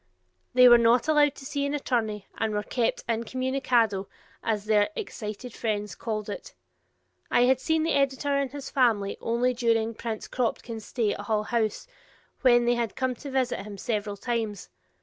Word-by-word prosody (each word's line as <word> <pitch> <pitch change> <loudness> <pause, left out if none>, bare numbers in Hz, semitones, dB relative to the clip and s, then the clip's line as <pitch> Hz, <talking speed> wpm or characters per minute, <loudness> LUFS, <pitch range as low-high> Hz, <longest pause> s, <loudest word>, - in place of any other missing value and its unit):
They 250 0 +8
were 240 -1 +8
not 235 +3 +4
allowed 295 -2 +4
to 270 - -11
see 285 0 -2
an 280 +1 -1
attorney 220 -7 -1
and 220 -1 -1
were 210 - -1
kept 235 0 -1
"in 230 -1 0
communicado" 245 -6 0 0.3
as 215 -2 -1
their 210 -1 +3
excited 240 - -6
friends 210 -3 -2
called 215 -2 -4
it. 205 - -7 0.7
I - - +3
had 255 +1 +4
seen 320 +3 +1
the 325 - +1
editor 280 +1 +1
and 280 -1 0
his 285 -1 -7
family 225 -7 +2
only 240 +2 +1
during 230 -2 +1
Prince 225 -1 -5
Kropotkin's 230 -2 -3
stay 225 -5 0
at - - -8
Hull 210 +1 0
House, 220 -2 -1 0.6
when 240 -2 +5
they 240 - +3
had 235 -4 -2
come 260 -1 0
to 285 - -8
visit 260 -2 0
him 200 +1 -8
several 205 -1 -2
times. 220 - -3
235 Hz, 175 wpm, -27 LUFS, 215-260 Hz, 0.7 s, They